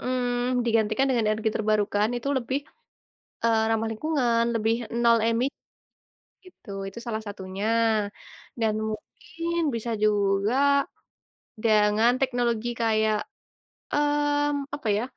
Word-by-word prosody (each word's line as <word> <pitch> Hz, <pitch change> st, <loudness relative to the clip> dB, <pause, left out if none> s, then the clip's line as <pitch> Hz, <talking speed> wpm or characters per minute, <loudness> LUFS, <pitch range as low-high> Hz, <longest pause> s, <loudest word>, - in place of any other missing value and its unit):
mmm, 245 Hz, -1 st, 0 dB
digantikan 225 Hz, +2 st, +2 dB
dengan 235 Hz, -4 st, +1 dB
energi 220 Hz, +1 st, 0 dB
terbarukan 210 Hz, -1 st, +1 dB
itu 240 Hz, +3 st, -4 dB
lebih, 260 Hz, +2 st, -2 dB, 0.8 s
eee, 225 Hz, -1 st, +3 dB
ramah 225 Hz, 0 st, +1 dB
lingkungan, 240 Hz, -2 st, +1 dB
lebih 225 Hz, 0 st, +1 dB, 0.3 s
nol 235 Hz, -1 st, +5 dB
emi 230 Hz, +2 st, +2 dB, 1.0 s
gitu. 365 Hz, -, -15 dB, 0.2 s
Itu 195 Hz, +4 st, -9 dB
salah 220 Hz, -1 st, -3 dB
satunya, 195 Hz, 0 st, -5 dB, 0.9 s
dan 220 Hz, -1 st, +2 dB
mungkin 330 Hz, +10 st, -5 dB
bisa 230 Hz, +1 st, -3 dB
juga 205 Hz, +1 st, +2 dB, 1.1 s
dengan 215 Hz, +1 st, +4 dB
teknologi 240 Hz, -3 st, 0 dB
kayak, 220 Hz, -1 st, +2 dB, 0.8 s
mmm, 290 Hz, -1 st, +1 dB
apa 285 Hz, -6 st, -6 dB
ya, 215 Hz, -, -1 dB
230 Hz, 105 wpm, -26 LUFS, 215-255 Hz, 1.1 s, nol